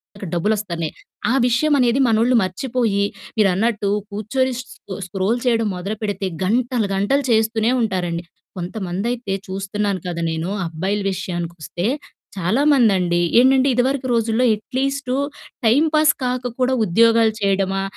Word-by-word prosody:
అక్కడ 200 -1 -7
డబ్బులు 205 +6 +1
ఒస్తాలే. 170 -6 -3 0.4
ఆ - - +2
విషయమనేది 255 0 +2
మనోళ్ళు 230 +3 +3
మర్చిపోయి, 220 +1 -1 0.3
మీరన్నట్టు 205 +1 +2 0.2
కూర్చొని 255 +6 -1
స్ - - -5
స్కొ 195 - -10
స్క్రోల్ 195 +5 -1
చెయడం 230 -3 +2
మొదలు 195 +4 -4
పెడితే 205 -2 -2 0.2
గంటలు 235 +2 +1
గంటలు 235 +9 +1
చేస్తూనే 220 +1 +2
ఉంటారండి. 180 -5 -1 0.3
కొంతమందై‌తే 195 +4 -3
చూస్తున్నాను 195 +1 -2
కదా! 170 -1 -3
నేను. 160 +2 -3 0.2
అబ్బాయిల 190 +6 -2
విషయానికొస్తే 175 -1 -4 0.5
చాలామందండి, 195 - +3 0.2
ఏంటంటే, 260 +1 +5
ఇదవరకు 260 +2 +1
రోజుల్లో 230 +1 +1
ఎట్లీస్టు 260 +4 -2 0.5
టైమ్ 255 +8 +4
పాస్ 310 0 +5
కాక 250 0 -1
కూడా 255 +1 +2
ఉద్యోగాలు 225 +3 +4
చెయడమా, 195 -1 +1
215 Hz, 120 wpm, -20 LUFS, 190-245 Hz, 0.5 s, ఏంటంటే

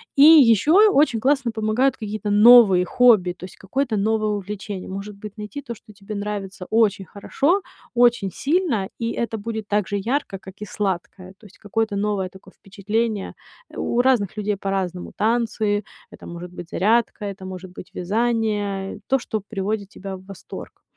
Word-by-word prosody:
И 275 - +3
ещё 300 - +7
и 435 - +7
очень 285 - +3
классно 265 -1 +1
помогают 225 +4 +1
какие-то 215 -2 -5
новые 205 -3 +7
хобби, 215 -4 +4
то 180 +1 -10
есть 185 - -12
какое-то 240 +4 -2
новое 215 +1 +1
увлечение. 205 -1 -5
Может 195 +2 -6
быть, 210 +1 -10
найти 210 +7 -7
то, 240 -4 -7
что 215 -1 -16
тебе 200 +1 -8
нравится 200 -2 -5
очень 210 -4 +2
хорошо, 290 - 0 0.3
очень 240 -5 +3
сильно, 280 - 0
и 230 0 -1
это 230 -1 -3
будет 220 0 -5
так 205 -2 +1
же 205 - -2
ярко, 230 -1 -2
как 190 0 -13
и - - -4
сладкое. 190 -2 -4
То 215 - -18
есть 205 +3 -17
какое-то 215 0 -2
новое 200 -2 -1
такое 190 +1 -16
впечатление. 210 +2 -3 0.3
Э, - - -13
у 240 - +1
разных 245 -7 +1
людей 210 -1 -1
по-разному: 190 -2 -3
танцы, 220 -2 0 0.3
это - - -13
может 170 +1 -8
быть 175 -1 -9
зарядка, 215 +2 +1
это 195 -1 -7
может 185 -1 -8
быть 180 - -11
вязание, 205 -1 -1
э, - - -15
то, 270 - +3
что 220 -2 -3
приводит 200 0 -3
тебя 195 -1 -7
в 185 - -17
восторг. 195 -1 -11
210 Hz, 175 wpm, -22 LUFS, 195-230 Hz, 0.3 s, ещё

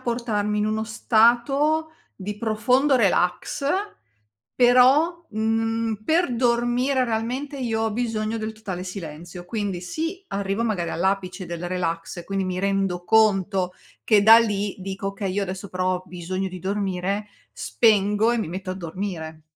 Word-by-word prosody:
portarmi 225 -4 -1
in 210 - +1
uno 215 0 -1
stato 250 +8 +2 0.2
di 205 +1 -6
profondo 250 +6 +2
relax. 195 +2 +1 0.9
Però, 270 +8 +4
mhmm, 225 0 -1
per 320 -3 +2
dormire 240 +2 +1
realmente 250 +5 -3
io 225 -4 -1
ho 225 -1 0
bisogno 225 -1 -2
del 220 0 -4
totale 195 -5 -6
silenzio. 175 -1 -8
Quindi 200 -3 -3
sì, 325 - -4
arrivo 200 +2 -2
magari 190 -7 -1
all'apice 185 0 -1
del 170 0 -5
relax 175 -1 -3
e 170 - -7
quindi 195 -1 -2
mi 185 -1 -3
rendo 195 -2 0
conto 195 -3 +3 0.3
che 210 -3 +4
da 225 +2 +9
lì 205 -3 -1
dico: 195 +1 -4
"Oka, 195 +1 -6
io 195 +2 -1
adesso 190 +1 -6
però 185 0 0
ho 180 - -4
bisogno 185 +2 -4
di 185 0 -8
dormire." 195 +1 -2 0.2
Spengo 210 0 +2
e 240 - 0
mi 215 - -2
metto 185 +2 -5
a 185 - -3
dormire. 165 -3 -6
210 Hz, 145 wpm, -24 LUFS, 185-235 Hz, 0.9 s, da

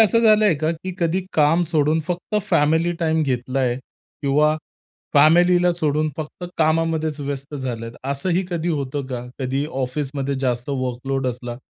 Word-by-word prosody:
असं 225 +1 +5
झालंय 215 -4 +5
का, 155 +2 0
की 180 +3 -6
कधी 175 +2 0
काम 160 +3 +4
सोडून 155 0 +2
फक्त 180 +4 -3
फॅमिली 160 +4 +3
टाईम 160 -1 +2
घेतलंय 130 -1 0 0.5
किंवा 150 +2 +3 0.6
फॅमिलीला 175 +4 +5
सोडून 155 -2 0
फक्त 155 +3 -6
कामामध्येच 160 -1 +1
व्यस्त 140 +1 -5
झालेत, 120 -4 -4
असंही 170 +7 0
कधी 175 0 -1
होतं 140 -3 -2
का, 125 -2 -5
कधी 135 +1 -1
ऑफिसमध्ये 135 0 -3
जास्त 125 -1 -1
वर्कलोड 130 0 -2
असला, 120 -1 -4
150 Hz, 140 wpm, -22 LUFS, 135-165 Hz, 0.6 s, असं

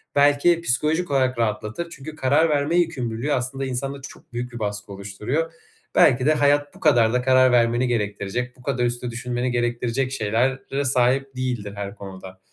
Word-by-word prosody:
belki 145 +4 +4
psikolojik 155 +3 0
olarak 130 -2 +1
rahatlatır. 110 +8 -2
Çünkü 155 -1 -9
karar 155 +3 +3
verme 145 +2 +1
yükümlülüğü 135 -5 -1
aslında 130 +2 -2
insanda 135 +2 -4
çok 135 - -13
büyük 120 +1 -4
bir 120 - -6
baskı 105 -1 -4
oluşturuyor. 105 +11 -3 0.4
Belki 125 0 +5
de 155 - +5
hayat 145 -1 +2
bu - - -15
kadar 120 -7 +4
da 125 - +2
karar 130 0 +5
vermeni 120 +1 +3
gerektirecek, 110 +2 -2
bu 125 - -17
kadar 125 -2 0
üstüne 120 0 -2
düşünmeni 125 +1 -2
gerektirecek 120 +2 -1
şeylere 130 +4 -1
sahip 130 +1 +1
değildir 120 -6 -3
her 100 0 -5
konuda. 95 -2 -10
125 Hz, 165 wpm, -23 LUFS, 115-140 Hz, 0.4 s, Belki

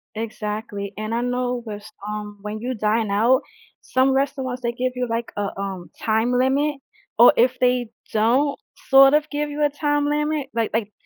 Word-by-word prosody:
Exactly, 210 -2 -5
and 215 +1 -3
I 235 - 0
know 245 0 -1
thas 210 -1 -7 0.2
um, 210 0 -5
when 210 +1 -5
you 250 +3 -3
dine 215 0 0
out, 235 +7 +3 0.4
some 260 +1 +1
restaurants 265 -2 -1
they 235 -1 -1
give 255 +1 -1
you, 250 0 -1
like, 230 +1 -2
a, 205 -1 -3
um, 195 -3 -5
time 225 +2 +1
limit 270 +4 +2 0.4
or 240 - +9
if 250 +2 +3
they 250 -1 +2 0.2
don't 250 +7 +2 0.3
sort 270 0 +8
of 300 0 +2
give 295 0 -2
you 295 +1 -2
a 295 - +4
time 290 0 0
limit, 300 -1 -1
like 230 -1 -1
like 220 -2 -1
245 Hz, 180 wpm, -22 LUFS, 215-270 Hz, 0.4 s, or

